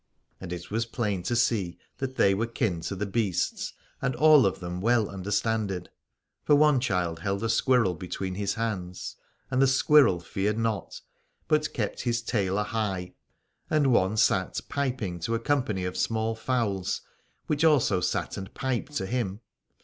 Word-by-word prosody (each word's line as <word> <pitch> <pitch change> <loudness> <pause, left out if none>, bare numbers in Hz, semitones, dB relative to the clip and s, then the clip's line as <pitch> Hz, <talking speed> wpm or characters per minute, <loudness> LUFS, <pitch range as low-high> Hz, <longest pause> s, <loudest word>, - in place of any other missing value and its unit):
And 90 -2 -7
it 90 +1 -6
was 115 +2 0
plain 105 -6 -2
to 120 - -1
see 100 -7 +1 0.2
that 130 -1 -3
they 95 - +4
were 110 +4 0
kin 110 -8 -1
to 100 - -3
the 100 +2 -2
beasts 100 -3 -1 0.3
and 130 - 0
of 150 -10 +5
them 90 0 -5
well 115 0 +3
understanded: 100 0 -2 0.5
for 145 - +5
one 150 -2 +5
child 90 -9 -1
held 100 +3 -2
a 115 - 0
squirrel 115 -4 +3
between 90 +1 -5
his 100 +1 -2
hands, 95 -6 -4 0.4
and 130 0 +2
the 135 - +6
squirrel 135 -7 +5
feared 100 +5 -2
not, 115 -2 -2 0.5
but 155 -1 +2
kept 110 -5 -3
his 120 -1 -1
tail 100 -5 0
a 105 - +1
high; 100 -4 -3 0.6
and 145 -4 +3
one 95 0 +2
sat 95 -3 +2
piping 125 -11 -2
to 115 +8 -1
a - - 0
company 115 -8 0
of 90 - -3
small 110 0 0
fowls, 110 -6 -1 0.4
which 150 0 0
also 135 - +4
sat - - -1
and 95 -1 -8
piped 130 +2 -2
to 95 - -1
him. 105 -2 -2
110 Hz, 165 wpm, -27 LUFS, 95-125 Hz, 0.6 s, the